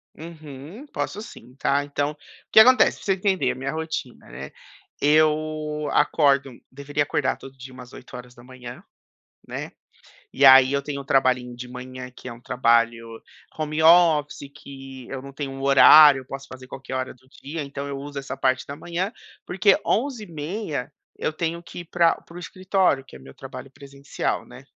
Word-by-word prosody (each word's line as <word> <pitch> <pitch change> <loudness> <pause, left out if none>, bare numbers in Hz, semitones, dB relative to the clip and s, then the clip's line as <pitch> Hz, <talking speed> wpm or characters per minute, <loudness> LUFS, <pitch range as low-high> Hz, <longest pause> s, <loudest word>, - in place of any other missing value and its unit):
Uhum, 155 - -11
posso 210 - -4
sim, 125 - -14
tá. 140 +1 0
Então, 145 0 -2
o - - -14 0.4
que - - +8
acontece 255 +4 +6
pra - - -14
você 195 - +2
entender 190 -7 0
a - - -6
minha 135 +2 -4
rotina, 160 -5 -6
né? 70 +1 -9 0.5
Eu 155 0 +1
acordo 140 -2 +2 0.2
deveria 140 +2 -4
acordar 145 -1 -1
todo 135 0 -14
dia 130 0 -11
umas 125 -1 -12
8h00, 125 0 -11 0.6
né. - - -6 0.6
E 140 - +3
aí, 130 0 +8
eu 140 - +1
tenho 140 0 -5
um - - -14
trabalhinho 130 -2 +1
de 125 +1 -8
manhã, 125 0 -9
que - - -11
é 125 - -6
um 115 - -15
trabalho 115 -2 +1 0.5
home 155 0 -2
office 160 -4 +4
que 135 -3 -11
eu 135 -1 -6
não 140 +1 -10
tenho 140 0 -6
um 135 - -8
horário, 140 +1 +8
eu - - -16
posso 135 +1 -8
fazer 130 0 -12
qualquer 135 0 -8
hora 130 0 -3
do 130 +1 -27
dia, 150 +3 -5
então 140 0 -6
eu 140 -1 -5
uso 140 0 -7
essa 135 - -6
parte 130 0 0
da 140 - -6
manhã 175 +6 -4 0.4
porque 195 +2 +3
11h30 185 - -3 0.3
eu - - -2
tenho 170 +1 -3
que 175 - -10
ir 175 - -8
pra 170 0 +2
para 170 - -17
o - - -7
escritório 185 -5 0
que - - -15
é - - -11
meu 65 0 -14
trabalho 130 0 -10
presencial, 140 0 -5
né. - - -14
140 Hz, 180 wpm, -23 LUFS, 130-155 Hz, 0.6 s, que